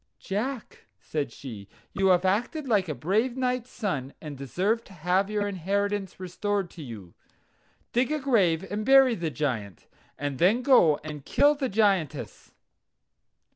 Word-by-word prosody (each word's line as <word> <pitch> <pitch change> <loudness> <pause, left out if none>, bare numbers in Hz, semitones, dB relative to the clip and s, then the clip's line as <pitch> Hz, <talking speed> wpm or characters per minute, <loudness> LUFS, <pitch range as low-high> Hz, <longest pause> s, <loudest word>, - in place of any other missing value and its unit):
"Jack," 225 +5 -5
said 145 +1 -3
she, 110 -7 -9 0.3
"you 195 -1 +1
have 180 0 +4
acted 245 - 0
like 200 -7 +2
a 155 - -2
brave 220 - 0
knight's 250 -1 -1
son, 145 - -3
and 150 -3 -7
deserve 185 - -1
to 195 - -15
have 180 +4 +1
your 210 -1 -1
inheritance 200 +1 -2
restored 190 +1 -2
to 170 - -10
you. 110 - -9 0.8
Dig 250 +4 +2
a 305 - +1
grave 195 - +2
and 210 +1 -2
bury 270 0 +6
the 170 -6 -2
Giaint, 115 - -3 0.3
and 145 -2 -4
then 210 +9 +3
go 170 - +5
and 150 -2 -7
kill 290 - +4
the 275 -3 -2
Giantess." 185 - 0
195 Hz, 150 wpm, -27 LUFS, 155-225 Hz, 0.8 s, bury